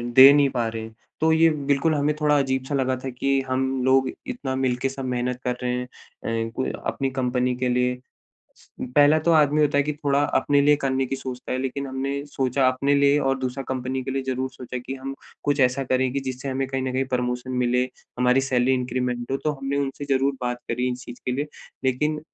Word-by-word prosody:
दे 135 +2 +11
नहीं 145 -1 +4
पा 120 -3 -1
रहें। 110 0 -5 0.3
तो 160 0 +4
ये 165 +1 +5 0.2
बिल्कुल 145 +3 +2
हमें 145 +1 +1
थोड़ा 150 -1 +4
अजीब 130 -1 0
सा 145 - 0
लगा 130 -1 +1
था 135 - -3
कि 135 +2 0
हम 130 +1 +1 0.2
लोग 130 0 +4 0.2
इतना 140 - -3
मिलके 130 0 0
सब 135 0 -6
मेहनत 125 0 -2
कर 125 0 -1
रहे 125 - 0
हैं, 125 0 -2
अ, - - -15 0.3
क - - 0
अपनी 135 -1 -1
कंपनी 125 -1 0
के 125 0 -1
लिए। 125 0 +1 1.0
पहला 145 +2 +6
तो 170 - +5
आदमी 150 -1 +4
होता 145 -1 +2
है - - +5
कि 150 - -1
थोड़ा, 145 -1 +1
अपने 145 -1 +2
लिए 145 +1 +5
करने 135 -2 0
की 135 - -3
सोचता 130 -1 -6
है 130 - -1
लेकिन 135 +1 -3
हमने 135 +2 -3
सोचा 135 -1 +1
अपने 140 +2 +1
लिए 140 +1 +4
और 135 -1 +1
दूसरा 130 +1 -3
कंपनी 130 0 -2
के 135 - -3
लिए 135 0 -1
ज़रूर 130 0 -1
सोचा 125 0 -7
कि 135 - -4
हम 135 +1 -6 0.3
कुछ 145 -1 +1
ऐसा 130 +1 +2
करें 130 0 +1
कि 140 - -1
जिससे 130 +1 -5
हमें 135 0 -1
कहीं 135 -1 -2
न 130 -1 -2
कहीं 130 +1 0
प्रमोशन 125 +1 -2
मिले, 125 +1 +2 0.3
हमारी 125 +1 +4
सैलरी 130 -1 +2
इंक्रीमेंट 125 -1 -2
हो 135 - +1
तो 150 - +2
हमने 135 +1 -2
उनसे 140 0 -2
ज़रूर 135 +1 +2
बात 125 0 -1
करी 125 +2 0
इस 125 +1 -8
चीज़ 120 - -10
के 125 - -1
लिए। 145 +3 -1 0.4
लेकिन 150 +4 0
130 Hz, 220 wpm, -24 LUFS, 125-140 Hz, 1.0 s, दे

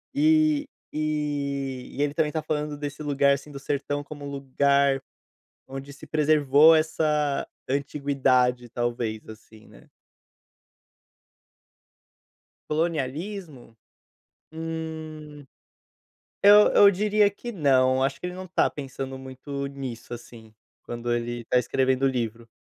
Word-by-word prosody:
eh 310 0 +4 0.3
eh, - - -5
e 140 -4 -2
ele 145 0 +1
também 155 -1 +1
tá 155 - -2
falando 150 -1 -2
desse 145 0 -6
lugar, 140 -1 +3
assim, 140 +2 -6
do 140 - -8
sertão 145 +1 -2
como 145 -1 -9
um 140 - -5
lugar 140 0 +2 0.7
onde 135 +1 -8
se 145 - -13
preservou 150 0 +5
essa 155 -2 0 0.2
antiguidade 135 -3 +1
talvez, 120 -2 -3
assim, 110 0 -14
né? - - -18 2.8
Colonialismo? 155 - -3 0.8
Hum, 160 -2 -6 1.0
eu 205 +1 +8
eu 200 - +8
diria 210 +1 +3
que 240 +4 -8
não, 130 - +3
acho 135 0 -1
que - - -6
ele 180 - -4
não 185 0 -8
tá 175 - +2
pensando 135 -1 -6
muito 140 +1 -6
nisso, 135 -4 -7
assim, 115 -2 -14 0.3
quando 120 0 -3
ele 120 0 -3
tá 125 - +2
escrevendo 130 +2 0
o 135 - +5
livro, 115 -2 -3
140 Hz, 120 wpm, -25 LUFS, 130-155 Hz, 2.8 s, eu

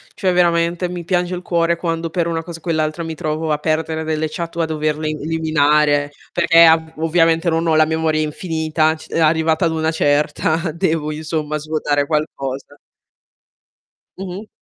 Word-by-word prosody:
cioè 190 -4 0
veramente 170 0 +1
mi 175 -1 -6
piange 180 0 0
il 180 - -6
cuore 170 -1 +1
quando 165 -1 -2
per 170 +1 -1
una 165 -1 -2
cosa 165 0 -8
o - - -28
quell'altra 155 -1 -1
mi 160 0 -5
trovo 155 0 -2
a - - 0
perdere 160 +1 -1
delle 155 0 -1
chat 170 +1 -6
o - - +1
a - - +2
doverle 155 -1 -2
eliminare, 150 -2 +1 0.2
perché 170 -1 +6
a 160 0 +7
v 160 0 -12
ovviamente 165 +1 +2
non 165 0 0
ho 160 - +3
la 155 - +5
memoria 160 0 0
infinita, 160 0 0
c 155 - -13
e - - -1
arrivata 160 +1 +2
ad 165 - +1
una 160 0 0
certa 155 +2 0
devo 160 -3 -1
insomma 155 0 -3
svuotare 150 -1 -1
qualcosa. 145 -2 -3 1.4
Mh-mh. 195 +2 -7
160 Hz, 170 wpm, -19 LUFS, 155-170 Hz, 1.4 s, a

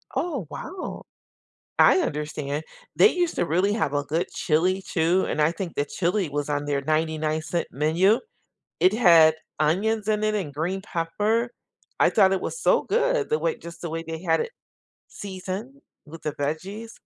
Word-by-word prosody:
Oh, 285 - -2
wow. 355 - -7 0.8
I - - +7
understand, 150 - -3 0.3
they 425 - +7
used 350 -2 0
to - - +1
really 180 +6 +1
have 160 -10 -1
a 145 0 0
good 160 +5 -1
chili 180 +5 +1
too, 175 +1 +1
and 155 - -1
I 150 +2 +4
think 170 0 -6
the 145 - +1
chili 175 +3 -1
was 145 0 -2
on 145 0 -1
their 145 -1 0
99¢ 155 +2 -1
menu. 170 - +3 0.6
It 185 +3 +4
had 170 -8 +6 0.2
onions 200 +8 +1
in 215 -1 +1
it 215 0 +1
and 175 -9 -3
green 175 +6 -2
pepper, 210 +7 -1 0.5
I - - +5
thought 195 -3 +4
it 195 - +1
was - - -4
so - - +3
good, 480 +1 +1
the 460 0 +1
way 485 -2 -1
just 170 0 -11
the 170 - -4
way 165 +1 -4
they 160 0 -5
had 165 -3 +2
it - - -3 0.6
seasoned 200 +7 -7 0.2
with 165 +1 -11
the 150 - -1
veggies. 185 +10 -4
175 Hz, 170 wpm, -25 LUFS, 155-215 Hz, 0.8 s, I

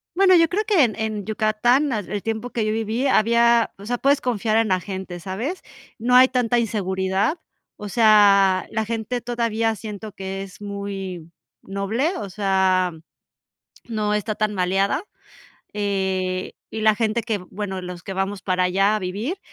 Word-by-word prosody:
Bueno, 375 -1 +6
yo 330 -1 +5
creo 410 +4 0
que 375 -10 +4
en 215 -4 +1
en 215 -2 -3
Yucatán, 230 +6 +2
ah, 215 - 0
el 205 +1 -5
tiempo 225 +2 -3
que 225 -3 -2
yo 215 - 0
viví, 225 +4 -1
había 235 -1 +4
o 200 - -11
sea, 245 +3 -1
puedes 280 +3 +3
confiar 225 -3 0
en 225 -1 +3
la 185 -2 +2
gente, 190 -2 -6
¿sabes? 225 - -4 0.4
No 250 +2 +2
hay 255 +1 +8
tanta 245 -2 +1
inseguridad, 195 - 0 0.4
o 210 - -7
sea, 200 -4 +5
la 220 0 -1
gente 230 +2 -3
todavía 230 -2 0
siento 210 0 -7
que 195 0 -5
es 190 0 -12
muy 195 -4 -6 0.3
noble, 210 - -1
o 200 - -5
sea, 190 -2 +1 0.9
no 215 -2 -1
está 210 +1 -1
tan 215 0 -1
maleada. 195 - 0 0.7
Eh, 190 -2 -1 0.2
y 220 - -5
la 215 0 +5
gente 225 +1 0
que 220 -2 -2
bueno, 190 +1 -6
los 180 -1 -8
que 195 - -6
vamos 195 +1 -3
para 185 -1 +1
allá 195 +4 +2
a - - -1
vivir, 210 - -4
210 Hz, 170 wpm, -22 LUFS, 195-235 Hz, 0.9 s, hay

